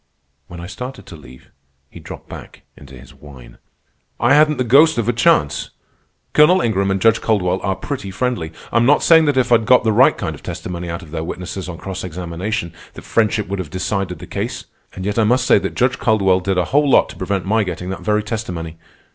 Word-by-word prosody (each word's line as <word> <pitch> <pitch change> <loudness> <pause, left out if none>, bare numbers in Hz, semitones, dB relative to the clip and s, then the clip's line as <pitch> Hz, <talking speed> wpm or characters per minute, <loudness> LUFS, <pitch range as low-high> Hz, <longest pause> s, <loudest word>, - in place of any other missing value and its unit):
When 85 - -10
I 85 - -7
started 125 +9 -8
to 85 - -11
leave, 65 -4 -16 0.4
he - - -11
dropped - - -11
back - - -11
into 70 -2 -14
his 60 - -15
whine. 70 -4 -15 0.6
"I 120 +4 +3
hadn't 150 +1 +4
the 130 - 0
ghost 140 +6 +5
of 115 -2 -1
a 120 - +2
chance. 115 - +1 0.6
Colonel 155 +5 +5
Ingram 100 - 0
and 95 0 0
Judge 115 +2 +3
Caldwell 95 -4 0
are 95 -1 -1
pretty 130 -6 -6
friendly. 105 -5 -3 0.2
I'm 115 +1 +3
not 145 - +4
saying 160 -1 +6
that 145 -3 +1
if 125 -1 +1
I'd 115 -2 +3
got 125 - +5
the 110 - +2
right 105 - +4
kind - - -4
of - - -12
testimony 90 -1 -6
out 85 +2 -5
of 80 - -14
their 80 -1 -4
witnesses 90 +2 -6
on 85 - -7
cross 95 +1 -6
examination, 90 +2 -4 0.2
that - - -11
friendship 110 -2 0
would 100 +1 -4
have 90 -5 -5
decided 95 0 -3
the - - -10
case. - - -5 0.3
And 95 - -7
yet 105 +2 -1
I - - +4
must 125 +4 +2
say - - +5
that - - -5
Judge 125 0 +1
Caldwell 95 -5 +2
did 95 0 -2
a 90 - +1
whole 145 0 +3
lot - - +4
to - - -10
prevent 95 0 -3
my 110 +3 +1
getting 90 0 -5
that 95 - -6
very 105 0 0
testimony. 90 -7 -5
100 Hz, 225 wpm, -18 LUFS, 90-120 Hz, 0.6 s, saying